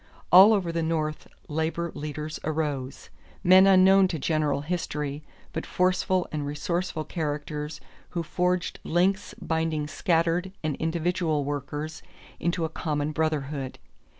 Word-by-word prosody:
All 190 +4 +10
over 185 -5 0
the 165 0 -1
North 155 -1 -2 0.2
labor 160 +2 -2
leaders 150 +1 -5
arose 145 -4 -3 0.3
men 185 +2 +7
unknown 190 0 +6
to 175 - -3
general 150 -1 0
history 150 -3 -3 0.3
but 160 - -3
forceful 185 0 +1
and 150 -2 -2
resourceful 160 +3 -2
characters 150 -1 -4 0.3
who 170 -1 -3
forged 180 +2 -1
links 190 +4 +1
binding 160 -2 -1
scattered 170 +2 0
and 155 -2 -1
individual 160 -2 0
workers 145 +2 -4 0.4
into 170 -1 0
a - - 0
common 150 -2 -2
brotherhood. 150 -4 -2
160 Hz, 125 wpm, -26 LUFS, 150-175 Hz, 0.4 s, All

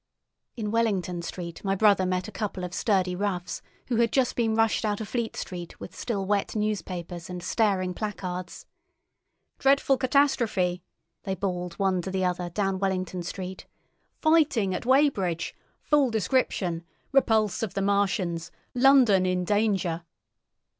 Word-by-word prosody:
In 210 -2 -2
Wellington 195 -6 0
Street 170 -1 -7
my 195 -1 +1
brother 200 -2 +4
met 185 +2 -1
a - - -8
couple 200 -4 -4
of 180 0 -5
sturdy 185 -4 +1
roughs 185 -2 -2 0.3
who 240 - +1
had 230 -1 +3
just 260 -3 +2
been 225 -2 +1
rushed 225 0 +2
out 210 -2 0
of 220 - -5
Fleet 235 -1 -2
Street 175 -2 -6
with - - -9
still 200 -5 -2
wet 205 +2 0
newspapers 180 -5 -3
and 180 -1 -6
staring 190 -3 +1
placards. 185 -3 -5 0.9
"Dreadful 275 0 +4
catastrophe!" 235 -10 +2 0.4
they 190 -1 -3
bawled 180 -2 -3
one 190 -2 +1
to 190 - -5
the 190 0 0
other 180 -1 -1
down 195 +1 -1
Wellington 185 -2 -1
Street. 185 +1 -6 0.5
"Fighting 295 - +3
at 235 - -4
Weybridge! 255 - +2 0.3
Full 290 -3 +3
description! 195 -6 0 0.3
Repulse 220 -7 +3
of 210 -5 -3
the 195 - 0
Martians! 190 -4 0 0.2
London 245 -8 +5
in 180 0 0
Danger!" 195 -5 +1
195 Hz, 145 wpm, -27 LUFS, 180-225 Hz, 0.9 s, London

